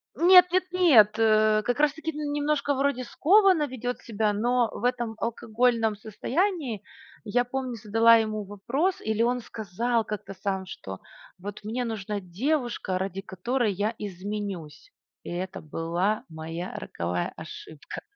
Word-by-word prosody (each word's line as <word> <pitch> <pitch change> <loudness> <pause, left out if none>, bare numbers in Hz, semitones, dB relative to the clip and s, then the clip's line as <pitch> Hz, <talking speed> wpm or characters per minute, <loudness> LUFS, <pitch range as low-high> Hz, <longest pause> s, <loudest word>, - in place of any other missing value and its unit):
Нет, 360 +1 +8
нет, 370 +1 +3
нет. 240 - +5
Э, 215 -1 +4
как 245 +5 -1
раз 300 -2 +4
таки, 320 +1 -4
м, 295 -1 -4
немножко 290 0 +1
вроде 275 -1 0
скованно 360 - +4
ведет 245 -1 -4
себя, 215 -2 0
но 240 +2 +2
в - - -8
этом 240 -2 0
алкогольном 230 -1 +1
состоянии, 245 - -2 0.4
я 245 +3 +1
помню, 255 0 -3
задала 225 +1 +5
ему 215 -2 0
вопрос, 255 - -1
или 220 0 -1
он 245 +2 +2
сказал 230 +1 -2
как-то 210 -2 -6
сам, 190 0 -3
что: 95 - -8 0.4
"Вот 205 +3 -8
мне 240 +4 -2
нужна 210 -2 -3
девушка, 220 - -1
ради 190 0 -3
которой 215 +5 -1
я 205 +4 -1
изменюсь". 200 - -6 0.3
И - - -8
это 185 +2 -4
была 170 +7 -1
моя 165 +3 -6
роковая 90 +1 -3
ошибка. 155 -1 -9
220 Hz, 140 wpm, -27 LUFS, 200-255 Hz, 0.4 s, Нет